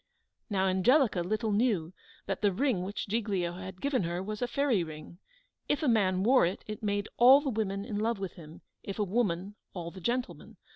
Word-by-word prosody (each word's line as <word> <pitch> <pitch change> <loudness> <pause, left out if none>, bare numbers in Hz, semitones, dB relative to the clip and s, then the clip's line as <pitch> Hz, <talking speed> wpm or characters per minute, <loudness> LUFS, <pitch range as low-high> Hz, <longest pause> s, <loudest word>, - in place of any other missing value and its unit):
Now 195 -2 +1
Angelica 200 - +3
little 215 +5 -1
knew 200 -6 +1 0.3
that - - -3
the 205 -2 +3
ring 235 -1 0
which 195 +4 -4
Giglio 200 -5 -1
had 185 +1 -8
given 280 -4 +1
her 175 +1 -2
was 210 +1 -5
a 245 - +1
fairy 260 -9 +1
ring; 155 +2 -10 0.5
if 295 +2 +1
a - - +2
man 190 -5 +2
wore 255 +4 +5
it, 175 +3 -1
it 215 +3 -7
made 205 -1 -1
all 255 +4 +8
the 285 -2 -2
women 200 -3 -2
in 210 -3 -3
love 225 +1 0
with 195 -2 -5
him; 160 -1 -13 0.2
if 195 - -6
a 210 - +1
woman, 195 -2 -1 0.2
all 170 -2 -5
the 185 - -11
gentlemen. 245 +6 -3
205 Hz, 200 wpm, -30 LUFS, 185-235 Hz, 0.5 s, all